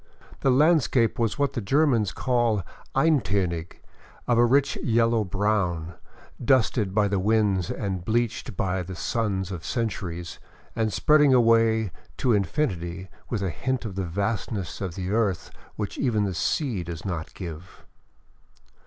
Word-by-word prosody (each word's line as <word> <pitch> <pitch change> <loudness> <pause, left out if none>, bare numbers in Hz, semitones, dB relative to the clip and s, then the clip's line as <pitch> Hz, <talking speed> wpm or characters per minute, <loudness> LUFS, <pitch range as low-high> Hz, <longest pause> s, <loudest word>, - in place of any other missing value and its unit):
The 135 - +2
landscape 130 -5 +3
was 115 -2 0
what 140 -1 0
the 120 - -2
Germans 120 - +2
call 120 -2 +1 0.3
eintonig, 100 - +1 0.5
of 120 -1 +3
a 120 - +6
rich 140 +3 +3
yellow 115 -1 +2
brown, 90 -4 -1 0.5
dusted 115 -6 +2
by 105 -1 +3
the 100 -1 0
winds 100 -3 +2
and 95 -4 -3
bleached 115 -2 -1
by 95 -1 0
the 90 +1 -7
suns 100 -2 -2
of 85 -3 -6
centuries, 90 -7 -3 0.4
and 110 -2 0
spreading 150 +4 +4
away 115 -3 +3 0.3
to 125 - +2
infinity 95 - -1 0.2
with 110 -5 -2
a 95 - -1
hint 130 +5 -2
of 105 - -5
the 95 +1 -2
vastness 100 - -3
of 90 -4 -4
the 95 0 -4
earth 105 -5 0 0.2
which 105 -2 -4
even 115 -6 +1
the 100 -2 -1
sea 110 - -1
does 85 -2 -7
not 85 -4 -4
give. 85 0 -9
105 Hz, 145 wpm, -25 LUFS, 95-120 Hz, 0.5 s, a